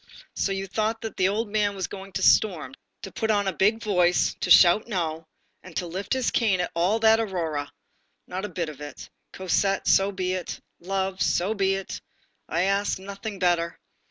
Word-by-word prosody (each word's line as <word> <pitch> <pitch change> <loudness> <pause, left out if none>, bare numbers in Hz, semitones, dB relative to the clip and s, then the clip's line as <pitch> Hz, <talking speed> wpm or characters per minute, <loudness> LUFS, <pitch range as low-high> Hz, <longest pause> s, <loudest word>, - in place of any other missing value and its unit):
so 195 - 0
you 195 0 -2
thought 215 +3 -1
that 225 -2 -6
the 185 - +2
old 215 +3 -1
man 205 -1 0
was 190 -2 -2
going 195 0 -9
to - - -3
storm, 195 - +3 0.3
to - - -7
put 220 - -2
on 205 -2 +2
a 190 - 0
big 220 +4 +2
voice, 180 -4 +2
to - - -2
shout 180 +6 +7
no, 165 -6 -3 0.3
and 185 -3 -13
to 180 - -1
lift 185 +6 -3
his 260 -2 0
cane 210 -6 +2
at 180 - -2
all 180 +6 +2
that 225 0 +5
aurora. 165 -9 -2 0.5
Not 185 +2 -5
a 210 - -3
bit 170 -3 -3
of 150 -1 -11
it. 145 0 -9 0.2
Cosette, 195 +1 0
so 195 +1 +4
be 185 -1 -2
it; 185 -2 -5 0.2
love, 190 +1 -2
so 190 +5 +1
be 195 -2 +1
it; 195 -1 -6 0.5
I 170 +2 +1
ask 200 +1 +1
nothing 200 +2 -7
better. 175 -2 +1
195 Hz, 195 wpm, -25 LUFS, 180-205 Hz, 0.5 s, shout